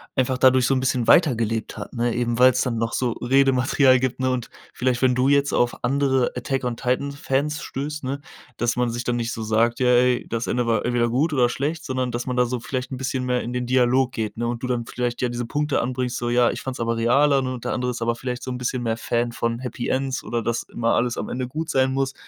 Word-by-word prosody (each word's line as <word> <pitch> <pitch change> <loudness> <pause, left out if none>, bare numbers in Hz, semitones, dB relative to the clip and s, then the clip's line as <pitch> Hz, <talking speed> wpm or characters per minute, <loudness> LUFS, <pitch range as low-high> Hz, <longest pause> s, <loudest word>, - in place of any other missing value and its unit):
einfach 130 -1 +1
dadurch 130 -1 +4
so 135 - +2
'n - - +1
bisschen 130 -2 0
weitergelebt 115 - +2
hat, - - -8
ne? 120 -1 0
Eben 120 -1 -1
weil's 125 0 +5
dann 125 -3 -1
noch 115 0 -1
so 125 -3 0
Redematerial 130 +1 +3
gibt, 130 0 -2
ne? 130 0 +1
Und 125 -2 -2 0.2
vielleicht, 125 -1 -1
wenn 130 -1 +3
du 130 +2 +2
jetzt 140 0 +3
auf 120 0 0
andere 135 0 +1
Attack-on-Titan-Fans 135 +3 -1
stößt, 145 +2 -5
ne, 135 +2 -3 0.4
dass 120 0 0
man 125 -1 0
sich 120 +1 -4
dann 120 0 -1
nicht 115 0 -2
so 115 - -5
sagt 115 +2 +1
ja: 125 - +2
„Ey, 125 0 +3
das 115 0 -2
Ende 120 -1 -1
war 115 -2 +1
entweder 120 -1 +1
gut 145 +7 +1
oder 125 -3 +3
schlecht", 155 +6 -3
sondern 130 -2 -2
dass 120 +1 -4
man 125 -1 -2
da 125 - +4
so 125 +1 -3
vielleicht 130 +2 -4
'n 130 - -4
bisschen 130 0 -2
mehr 125 0 0
in 120 - -5
den 125 0 -2
Dialog 130 +1 +2
geht, 110 -3 -4
ne? 120 - -2
Und 120 0 -3
du 125 - -3
dann 120 -2 -1
vielleicht 120 0 -3
ja 125 - +1
diese 120 0 -3
Punkte 150 +3 0
anbringst, 125 0 -2
so: 120 - -2
„Ja, 120 0 +3
ich - - -6
fand 130 -1 -5
es - - -9
aber 115 0 -1
realer" 135 +5 +3
und 130 -2 -4
der - - -1
andere 125 0 -1
ist 120 - -6
aber 120 0 +1
vielleicht 125 0 -5
so 130 - -4
'n 125 - -4
bisschen 125 0 -2
mehr 115 -1 -1
Fan 120 0 -1
von 115 0 -2
Happy 125 0 -5
Ends 135 0 -1
oder 120 -1 -2
das 115 +2 -1
immer 115 0 0
alles 120 0 0
am - - -4
Ende 125 0 -3
gut 155 +5 -5
sein 130 0 +2
muss. 135 0 -1
125 Hz, 255 wpm, -23 LUFS, 120-130 Hz, 0.4 s, weil's